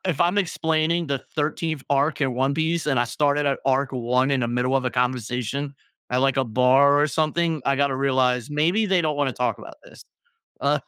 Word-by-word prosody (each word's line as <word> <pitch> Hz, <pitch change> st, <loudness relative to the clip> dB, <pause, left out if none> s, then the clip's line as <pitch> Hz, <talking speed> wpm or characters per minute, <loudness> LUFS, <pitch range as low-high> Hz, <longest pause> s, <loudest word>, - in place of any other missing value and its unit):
if 170 Hz, -6 st, -2 dB
I'm 175 Hz, +4 st, +2 dB
explaining 165 Hz, -2 st, 0 dB
the 140 Hz, -1 st, -1 dB, 0.2 s
13th 155 Hz, 0 st, -2 dB
arc 145 Hz, +3 st, +1 dB
in 135 Hz, -3 st, 0 dB
One 135 Hz, +3 st, 0 dB
Piece, 160 Hz, +1 st, -1 dB
and 135 Hz, -5 st, +1 dB
I -, -, +2 dB
started 145 Hz, +3 st, 0 dB
at 140 Hz, -, 0 dB
arc 135 Hz, 0 st, +1 dB
1 125 Hz, +2 st, 0 dB
in 135 Hz, -2 st, +1 dB
a -, -, -2 dB
middle 125 Hz, +2 st, 0 dB
of 135 Hz, -, 0 dB
the 125 Hz, -, 0 dB
conversation, 125 Hz, +3 st, -2 dB, 0.4 s
at, 125 Hz, -, +1 dB
like, 135 Hz, 0 st, +1 dB
a 135 Hz, -, +2 dB
bar 130 Hz, +5 st, +4 dB
or 150 Hz, -, +3 dB
something, 155 Hz, +1 st, -1 dB
I 140 Hz, 0 st, +2 dB
gotta 140 Hz, -1 st, +1 dB
realize, 130 Hz, -2 st, 0 dB
maybe 170 Hz, +9 st, +1 dB
they 190 Hz, -2 st, +2 dB
don't 155 Hz, -2 st, -1 dB
wanna 145 Hz, -2 st, 0 dB
talk 125 Hz, +1 st, -2 dB
about 330 Hz, -, -11 dB
this, -, -, -16 dB, 0.6 s
uh, -, -, +1 dB
140 Hz, 210 wpm, -23 LUFS, 130-155 Hz, 0.6 s, bar